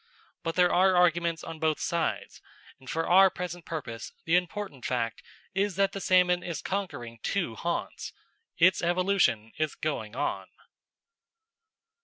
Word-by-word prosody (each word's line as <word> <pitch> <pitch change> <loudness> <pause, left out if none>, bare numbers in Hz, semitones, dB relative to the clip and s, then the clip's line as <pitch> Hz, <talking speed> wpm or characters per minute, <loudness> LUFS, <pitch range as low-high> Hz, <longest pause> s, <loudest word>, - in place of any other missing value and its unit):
But 165 -1 -3
there 180 -1 +4
are 185 +1 +4
arguments 170 -2 +2
on 165 -1 -7
both 155 -1 +1
sides, 170 -2 -2 0.4
and, 130 0 -13
for 165 0 -1
our 190 +2 +7
present 175 -2 -6
purpose, 130 -8 -6
the 165 - +3
important 180 -6 -2
fact 115 -3 -2 0.3
is 195 0 0
that 195 +1 +2
the 195 - -6
salmon 180 -1 +4
is 170 -4 -5
conquering 165 - -4
two 180 - -1
haunts. 170 +9 -4 0.5
Its 180 +2 +5
evolution 175 - +2
is 155 -1 -1
going 115 -8 -3
on. - - -2
170 Hz, 140 wpm, -28 LUFS, 155-185 Hz, 0.5 s, our